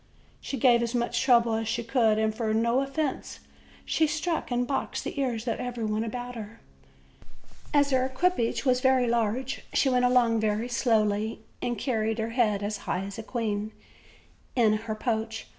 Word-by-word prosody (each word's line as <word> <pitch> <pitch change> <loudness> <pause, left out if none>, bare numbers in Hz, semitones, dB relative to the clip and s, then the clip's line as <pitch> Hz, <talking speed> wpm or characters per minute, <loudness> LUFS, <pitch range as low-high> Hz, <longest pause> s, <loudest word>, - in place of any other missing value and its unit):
She 275 - -5
gave 240 -1 +5
as 235 +1 -2
much 240 0 0
trouble 235 -3 +4
as 220 0 -1
she 225 +1 -1
could, 230 -2 +2
and 220 0 +1
for 220 -1 -1
no 235 +3 +2
offense 275 +1 -3 0.5
she 315 - +2
struck 310 +2 -2
and 245 0 0
boxed 270 +2 -2
the - - -5
ears 240 -3 -2
of 230 - -1
everybody 225 -3 -2
about 245 +2 -5
her. 225 -1 -9 1.1
As 285 -1 +3
her 260 -1 +3
equipage 260 -1 0
was 255 -1 +3
very 260 -1 +4
large, 235 +3 -1
she 275 - +3
went 250 -1 +3
along 245 -2 +3
very 215 +2 0
slowly, 220 -3 +1 0.2
and 240 -1 -2
carried 225 -4 -1
her 225 0 -2
head 215 -4 +1
as 205 0 -2
high 185 - 0
as 200 +3 -7
a - - -3
queen, 215 -2 -3 0.8
in 225 -4 +4
her 215 0 -3
poach. 225 0 -2
235 Hz, 175 wpm, -27 LUFS, 220-255 Hz, 1.1 s, gave